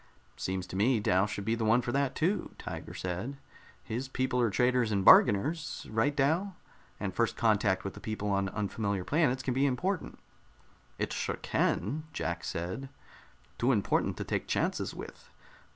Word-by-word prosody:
"Seems 95 Hz, -1 st, -3 dB
to 95 Hz, -, -8 dB
me 110 Hz, +5 st, +3 dB
Dal 95 Hz, 0 st, +2 dB
would 100 Hz, -, -5 dB
be 110 Hz, -, +1 dB
the 115 Hz, -1 st, -1 dB
one 115 Hz, +3 st, +4 dB
for 120 Hz, -, -2 dB
that, 140 Hz, 0 st, 0 dB
too," 185 Hz, +6 st, 0 dB
Tiger -, -, -7 dB
said. 95 Hz, +10 st, -4 dB, 0.5 s
"His 125 Hz, +4 st, -4 dB
people 130 Hz, -1 st, 0 dB
are 120 Hz, -, +3 dB
traders 125 Hz, +1 st, +2 dB
and 100 Hz, -2 st, 0 dB
bargainers; 150 Hz, +11 st, +5 dB
right, 115 Hz, +7 st, +1 dB
Dal? 165 Hz, +8 st, +1 dB, 0.4 s
And 100 Hz, -3 st, -3 dB
first 115 Hz, +3 st, 0 dB
contact 105 Hz, -4 st, +2 dB
with 100 Hz, -, -4 dB
the -, -, -10 dB
people 105 Hz, -2 st, -3 dB
on 100 Hz, 0 st, +1 dB
unfamiliar 100 Hz, -1 st, -2 dB
planets 135 Hz, -, +1 dB
can 125 Hz, -, 0 dB
be 135 Hz, +3 st, +3 dB
important." 165 Hz, +8 st, -2 dB, 0.8 s
"It -, -, -2 dB
sure -, -, -2 dB
can," 140 Hz, -, -1 dB
Jack -, -, -3 dB
said. 95 Hz, +11 st, -4 dB, 0.7 s
"Too 125 Hz, +3 st, +3 dB
important 105 Hz, -6 st, +1 dB
to -, -, -3 dB
take -, -, -2 dB
chances -, -, -1 dB
with. -, -, -10 dB
115 Hz, 170 wpm, -30 LUFS, 100-135 Hz, 0.8 s, bargainers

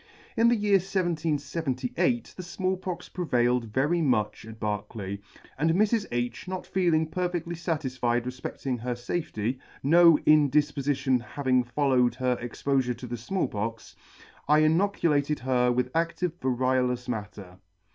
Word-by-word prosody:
In 230 Hz, -, +4 dB
the 240 Hz, -, +4 dB
year 205 Hz, -2 st, +3 dB
1778 155 Hz, -9 st, -1 dB
the -, -, -6 dB
Small 185 Hz, +2 st, -2 dB
Pox 180 Hz, -1 st, -6 dB
prevailed 125 Hz, -8 st, +1 dB
very 140 Hz, +10 st, 0 dB
much 110 Hz, -7 st, 0 dB
at 110 Hz, 0 st, -10 dB
Berkeley, 105 Hz, -2 st, -4 dB, 0.4 s
and 160 Hz, +3 st, +2 dB
Mrs. 215 Hz, +2 st, +2 dB
H 120 Hz, +4 st, -3 dB
not 185 Hz, 0 st, -4 dB
feeling 170 Hz, -4 st, +2 dB
perfectly 175 Hz, 0 st, -3 dB
fatisfied 130 Hz, -8 st, -1 dB
re 125 Hz, -, -2 dB
flecting 130 Hz, 0 st, -4 dB
her 120 Hz, +1 st, -3 dB
fafety 120 Hz, -2 st, -3 dB, 0.2 s
(no 165 Hz, +2 st, +7 dB
indifpofltion 145 Hz, -3 st, +3 dB
having 130 Hz, +1 st, 0 dB
followed 125 Hz, -1 st, +2 dB
her 125 Hz, -1 st, 0 dB
ex 120 Hz, -1 st, -8 dB
pofure 130 Hz, -4 st, +1 dB
to 125 Hz, -, -8 dB
the 120 Hz, 0 st, -4 dB
Small 175 Hz, -, -2 dB
Pox) 110 Hz, +2 st, -5 dB, 0.5 s
I 150 Hz, +1 st, +5 dB
inoculated 155 Hz, -4 st, +2 dB
her 125 Hz, -1 st, +2 dB
with 125 Hz, +1 st, -1 dB
adtive 170 Hz, +1 st, 0 dB
variolous 125 Hz, -1 st, 0 dB
matter. 105 Hz, -5 st, -6 dB
130 Hz, 135 wpm, -27 LUFS, 120-170 Hz, 0.5 s, no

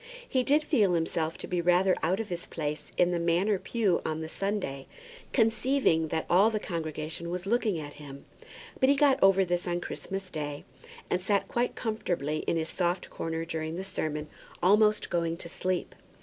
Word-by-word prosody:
He 260 Hz, -, +2 dB
did 290 Hz, +4 st, +3 dB
feel 215 Hz, -, +3 dB
himself 165 Hz, -1 st, -1 dB
to -, -, -6 dB
be 180 Hz, -1 st, 0 dB
rather 180 Hz, +2 st, +4 dB
out 180 Hz, +5 st, +1 dB
of 225 Hz, -, -4 dB
his 175 Hz, -1 st, -4 dB
place 150 Hz, -2 st, -4 dB
in 180 Hz, 0 st, +4 dB
the 175 Hz, -, 0 dB
Manor 175 Hz, +4 st, +2 dB
pew 210 Hz, -6 st, +1 dB
on 160 Hz, 0 st, -2 dB
the 160 Hz, -, -5 dB
Sunday, 190 Hz, -9 st, -3 dB, 0.4 s
conceiving 225 Hz, -, +2 dB
that 160 Hz, +1 st, -2 dB
all 195 Hz, +5 st, +5 dB
the 220 Hz, -1 st, -1 dB
congregation 160 Hz, -1 st, -4 dB
was 180 Hz, +1 st, -4 dB
looking 215 Hz, -3 st, +1 dB
at 145 Hz, -2 st, -6 dB
him; 140 Hz, -1 st, -10 dB, 0.5 s
but 260 Hz, -, +4 dB
he 280 Hz, -, +6 dB
got 280 Hz, -1 st, +4 dB
over 195 Hz, 0 st, +5 dB
this 175 Hz, 0 st, -1 dB
on 175 Hz, 0 st, 0 dB
Christmas 195 Hz, +1 st, -6 dB
Day, 145 Hz, -2 st, -4 dB, 0.5 s
and 180 Hz, -, +1 dB
sat 200 Hz, +1 st, +1 dB
quite 240 Hz, +1 st, -1 dB
comfortably 175 Hz, -, -2 dB
in 170 Hz, -, +2 dB
his 160 Hz, 0 st, -2 dB
soft 175 Hz, 0 st, -1 dB
corner 165 Hz, 0 st, -3 dB
during 160 Hz, -1 st, -3 dB
the 185 Hz, -, -4 dB
sermon, 155 Hz, -5 st, -3 dB, 0.4 s
almost 210 Hz, +3 st, +4 dB
going 170 Hz, -1 st, 0 dB
to 170 Hz, -, -7 dB
sleep. 185 Hz, +1 st, -2 dB
175 Hz, 185 wpm, -29 LUFS, 160-205 Hz, 0.5 s, he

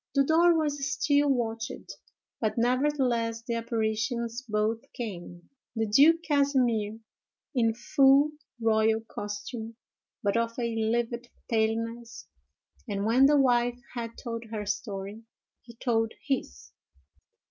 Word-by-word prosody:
The 275 Hz, -, +5 dB
door 330 Hz, +3 st, +4 dB
was 295 Hz, -3 st, -1 dB
still 290 Hz, -1 st, +2 dB
watched, 230 Hz, -3 st, -2 dB, 0.5 s
but 220 Hz, 0 st, -1 dB
nevertheless 245 Hz, -2 st, +1 dB
the 235 Hz, -, -3 dB
apparitions 230 Hz, +1 st, -2 dB
both 215 Hz, +2 st, 0 dB
came, 175 Hz, -6 st, -7 dB, 0.3 s
the 225 Hz, 0 st, 0 dB
Duke 300 Hz, +10 st, +5 dB
Casimer 255 Hz, -8 st, +1 dB, 0.6 s
in 230 Hz, -4 st, +2 dB
full 275 Hz, +4 st, +4 dB, 0.3 s
royal 220 Hz, 0 st, +2 dB
costume, 220 Hz, +1 st, -6 dB, 0.5 s
but 200 Hz, -1 st, +1 dB
of 230 Hz, 0 st, 0 dB
a 235 Hz, -2 st, -2 dB
livid 235 Hz, +2 st, -1 dB, 0.2 s
paleness; 230 Hz, +1 st, -2 dB, 0.6 s
and 200 Hz, 0 st, -2 dB
when 250 Hz, +5 st, +5 dB
the 295 Hz, 0 st, +4 dB
wife 245 Hz, -2 st, +2 dB
had 230 Hz, -2 st, -5 dB
told 230 Hz, -2 st, -5 dB
her 215 Hz, -2 st, -5 dB
story, 205 Hz, 0 st, -4 dB, 0.4 s
he 235 Hz, -1 st, -15 dB
told 225 Hz, -2 st, 0 dB
his. 70 Hz, -, -3 dB
230 Hz, 115 wpm, -28 LUFS, 220-255 Hz, 0.6 s, The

